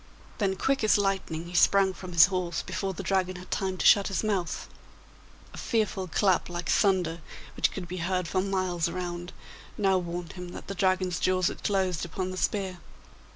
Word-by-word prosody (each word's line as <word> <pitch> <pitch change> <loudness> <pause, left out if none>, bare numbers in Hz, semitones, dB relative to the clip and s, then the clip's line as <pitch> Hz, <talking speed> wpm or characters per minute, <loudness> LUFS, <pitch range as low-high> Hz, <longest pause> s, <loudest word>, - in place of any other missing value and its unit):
Then 195 -3 +1
quick 270 +5 0
as 215 - +5
lightning 190 -5 -1
he 175 - -9
sprang 195 +1 +4
from 185 -1 -9
his 165 - +9
horse 180 -3 -2
before 195 -1 -3
the 185 - -6
Dragon 185 -1 0
had 180 +1 -11
time 190 -1 -1
to - - -2
shut 200 -1 +6
his 195 - -1
mouth. 195 -6 -2 0.9
A - - -8
fearful 210 -5 -1
clap 185 +2 +2
like 175 -1 -5
thunder, 180 -5 +2 0.3
which - - +2
could 185 -3 -7
be 180 +2 -5
heard 180 0 -1
for 185 - 0
miles 185 -3 -1
around, 175 0 -5 0.5
now 195 -3 +3
warned 175 -1 -5
him 180 -1 -7
that - - -8
the 195 - -5
Dragon's 185 -2 +1
jaws 185 -1 +2
had - - -9
closed 190 -4 0
upon 185 +2 -3
the 185 - -6
spear. 190 -2 -1
185 Hz, 190 wpm, -28 LUFS, 175-195 Hz, 0.9 s, his